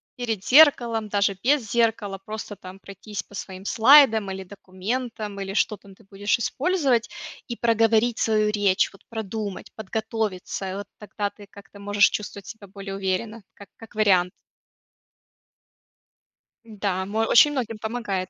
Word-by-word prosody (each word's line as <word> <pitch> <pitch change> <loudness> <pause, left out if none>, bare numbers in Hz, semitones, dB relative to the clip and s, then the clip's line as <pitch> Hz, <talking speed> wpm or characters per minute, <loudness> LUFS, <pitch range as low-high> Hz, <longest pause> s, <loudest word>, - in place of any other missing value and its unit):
перед 225 -6 -3
зеркалом, 240 -6 +5
даже 200 -1 +1
без 260 -4 +2
зеркала. 225 -4 0
Просто 215 +1 -7
там 185 +1 -11
пройтись 200 +1 -8
по 205 - -15
своим 190 -1 -8
слайдам 225 -3 +6
или 190 0 -6
документам, 205 +3 -5
или 195 0 -5
что 210 +1 +1
там 200 -1 -17
ты 220 - -22
будешь 205 +3 -1
использовать, 270 - 0 0.4
и 235 - -4
проговорить 230 0 +2
свою 215 -1 +2
речь. 205 -3 +2
Вот 195 - -19
продумать, 215 -3 -5
подготовиться, 215 -3 -4
и - - -5
вот 200 0 -6
тогда 210 -1 -4
ты 205 0 -15
как-то 200 0 -15
можешь 205 0 +3
чувствовать 205 -1 -6
себя 220 -3 -10
более 195 0 -8
уверенно, 195 +3 -3
как 200 - -14
как 225 - -14
вариант. 190 -4 +3 2.4
Да, 200 -4 -3
мо 210 +3 -3
очень 295 +5 +6
многим 235 -6 -3
помогает. 215 -4 -3
210 Hz, 145 wpm, -24 LUFS, 195-230 Hz, 2.4 s, слайдам